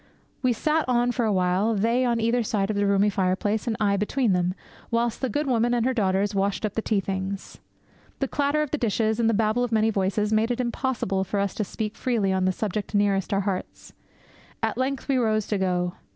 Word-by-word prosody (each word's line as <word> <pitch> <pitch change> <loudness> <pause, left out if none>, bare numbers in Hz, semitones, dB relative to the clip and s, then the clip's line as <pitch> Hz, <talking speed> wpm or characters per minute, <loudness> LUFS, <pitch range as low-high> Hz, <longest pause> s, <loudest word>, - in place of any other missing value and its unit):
We 255 -2 +2
sat 305 +5 0
on 245 0 +2
for 240 -1 -1
awhile, 195 +2 +1
they 230 +5 +2
on 235 -1 +1
either 230 +2 +2
side 210 -2 0
of - - -3
the 205 0 +1
roomy 200 +1 +3
fireplace, 200 +3 0
and 225 - -1
I 200 -2 +2
between 210 +2 +1
them, 180 0 0 0.3
whilst 235 0 0
the 260 - 0
good 295 +4 -1
woman 240 -2 +2
and 235 -1 +1
her 260 - +2
daughters 200 -2 +1
washed 200 +2 0
up 210 - -3
the 225 - -1
tea 215 -2 +1
things. 190 0 -5 0.6
The 270 - -1
clatter 290 +3 +1
of 300 - -6
the 300 - -1
dishes, 220 0 0
and 230 -1 +3
the 225 - +2
babel 220 +3 +1
of 245 - -2
many 220 0 +3
voices, 205 +2 0
made 220 +2 +2
it 245 0 -1
impossible 235 -6 -1
for 195 +2 -2
us 200 -1 0
to 215 - -2
speak 215 +2 -4
freely 220 -7 0
on 190 0 +1
the 185 - +3
subject 210 +2 -3
nearest 200 -2 +1
our 195 0 +2
hearts. 195 -2 -5 0.7
At 225 - 0
length 260 +2 -2
we 275 -2 +2
rose 215 -3 +1
to 205 - 0
go. 180 -1 0
215 Hz, 225 wpm, -25 LUFS, 195-240 Hz, 0.7 s, roomy